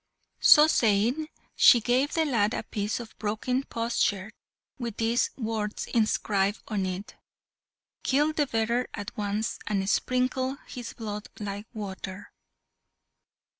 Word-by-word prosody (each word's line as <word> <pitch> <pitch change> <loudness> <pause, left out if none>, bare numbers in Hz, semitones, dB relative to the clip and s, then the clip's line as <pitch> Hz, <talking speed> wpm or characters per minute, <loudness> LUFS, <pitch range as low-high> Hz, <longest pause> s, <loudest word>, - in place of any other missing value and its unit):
So 300 - +8
saying, 240 +2 +2 0.3
she 240 - +7
gave 255 +5 +1
the 325 -1 +2
lad 230 -6 +1
a - - -3
piece 210 +1 -3
of 235 -2 -9
broken 220 +5 -1
potsherd, 220 -3 -1 0.5
with 235 -3 -4
these 230 +2 +1
words 220 -3 -3
inscribed 210 -2 +1
on 200 -4 -1
it 185 +3 -6 0.9
"Kill 295 +3 +2
the 295 -2 +1
bearer 235 +1 0
at 205 - -7
once, 210 +1 -2
and 195 -3 0
sprinkle 255 +4 0
his 245 -2 -7
blood 210 -2 -6
like 205 0 -5
water!" 200 -2 -7
220 Hz, 125 wpm, -27 LUFS, 205-250 Hz, 0.9 s, So